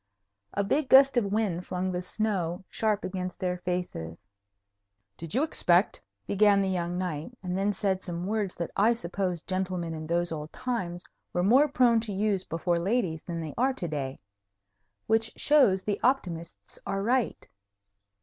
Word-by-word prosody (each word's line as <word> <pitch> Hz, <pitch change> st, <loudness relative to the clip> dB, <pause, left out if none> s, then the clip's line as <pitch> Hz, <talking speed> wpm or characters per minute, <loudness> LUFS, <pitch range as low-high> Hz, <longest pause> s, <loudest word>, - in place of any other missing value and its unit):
A 200 Hz, -, +1 dB
big 275 Hz, +7 st, 0 dB
gust 270 Hz, 0 st, +7 dB
of 240 Hz, -4 st, +3 dB
wind 200 Hz, -5 st, -1 dB
flung 185 Hz, 0 st, -2 dB
the 180 Hz, 0 st, -2 dB
snow 185 Hz, -2 st, -2 dB
sharp 215 Hz, -2 st, 0 dB
against 185 Hz, -1 st, -4 dB
their 180 Hz, -1 st, -1 dB
faces. 175 Hz, -, -3 dB, 1.0 s
"Did 165 Hz, +4 st, -7 dB
you 270 Hz, -, +3 dB
expect 180 Hz, -, +2 dB
" 100 Hz, 0 st, -52 dB
began 200 Hz, -, +4 dB
the 195 Hz, -1 st, +1 dB
young 175 Hz, -1 st, -2 dB
knight, 180 Hz, +5 st, -4 dB
and 180 Hz, -1 st, -2 dB
then 195 Hz, +2 st, +1 dB
said 190 Hz, -1 st, -1 dB
some 175 Hz, -2 st, -4 dB
words 205 Hz, -2 st, -1 dB
that 170 Hz, -, -4 dB
I 220 Hz, +4 st, +4 dB
suppose 180 Hz, -4 st, -3 dB
gentlemen 185 Hz, -3 st, -2 dB
in 155 Hz, -1 st, -6 dB
those 170 Hz, +1 st, 0 dB
old 150 Hz, -1 st, -5 dB
times 185 Hz, -9 st, -3 dB, 0.3 s
were 175 Hz, -, +1 dB
more 255 Hz, +10 st, +6 dB
prone 245 Hz, -4 st, +4 dB
to 220 Hz, -1 st, -4 dB
use 200 Hz, -1 st, 0 dB
before 170 Hz, +1 st, -1 dB
ladies 180 Hz, -4 st, 0 dB
than 170 Hz, -1 st, -5 dB
they 155 Hz, -2 st, -5 dB
are 265 Hz, +2 st, +3 dB
to 185 Hz, -9 st, -4 dB
day. 140 Hz, -4 st, -4 dB, 0.9 s
Which 225 Hz, 0 st, +1 dB
shows 245 Hz, -11 st, +4 dB
the 205 Hz, -1 st, -1 dB
optimists 180 Hz, -10 st, -1 dB
are 195 Hz, 0 st, -1 dB
right. 245 Hz, +2 st, 0 dB
185 Hz, 170 wpm, -28 LUFS, 175-220 Hz, 1.0 s, gust